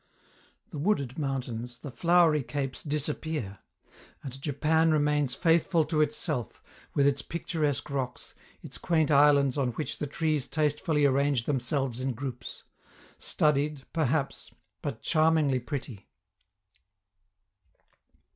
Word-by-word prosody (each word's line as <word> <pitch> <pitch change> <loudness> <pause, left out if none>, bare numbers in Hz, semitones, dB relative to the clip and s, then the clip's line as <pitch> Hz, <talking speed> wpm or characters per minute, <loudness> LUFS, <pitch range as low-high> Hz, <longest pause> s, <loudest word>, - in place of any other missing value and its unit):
The 150 - -6
wooded 140 - 0
mountains, 125 -4 -3
the 140 - -8
flowery 170 0 +4
capes 135 +2 -4
disappear. 150 -7 -3 0.6
And 135 0 -8
Japan 160 +3 +2
remains 150 -3 +2
faithful 165 -1 +3
to 155 -1 +1
itself, 150 - -2 0.3
with 140 - +3
its 140 0 +2
picturesque 155 -4 -2
rocks, 130 -3 -4 0.3
its - - -8
quaint 160 -3 +1
islands 140 -1 +5
on 125 -3 0
which 150 - -4
the 150 - -2
trees 150 -1 -1
tastefully 150 +1 +1
arrange 140 -2 +2
themselves 135 -1 -1
in 130 0 -1
groups 125 -1 -7 0.6
studied, 150 -1 0
perhaps, 150 -3 -1 0.3
but 110 - -5
charmingly 155 -4 +3
pretty. 125 -5 -6
145 Hz, 110 wpm, -28 LUFS, 130-155 Hz, 0.6 s, islands